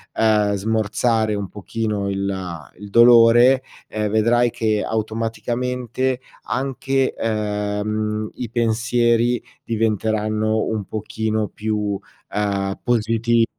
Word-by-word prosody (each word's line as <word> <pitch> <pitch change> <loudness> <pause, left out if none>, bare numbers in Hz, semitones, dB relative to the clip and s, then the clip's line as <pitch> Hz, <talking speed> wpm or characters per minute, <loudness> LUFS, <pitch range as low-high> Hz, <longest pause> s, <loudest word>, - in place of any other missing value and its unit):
uhm, 105 -2 +3
smorzare 110 +1 0
un 100 -1 -3
pochino 105 -1 -3
il 95 -4 -4
il 105 0 -9
dolore, 120 +3 +7 0.3
ehm, 105 -1 -2
vedrai 120 +3 +3
che 110 -2 0
automaticamente 120 +3 -2 0.2
anche, 135 0 -1
ehm, 105 0 -2
i 120 -3 -5
pensieri 120 +1 +1 0.2
diventeranno 110 -1 0
un 105 -3 -2
pochino 110 0 -2
più, 110 0 -2 0.5
uhm, 100 -2 -1
positi 115 -1 +2
110 Hz, 95 wpm, -21 LUFS, 105-120 Hz, 0.5 s, dolore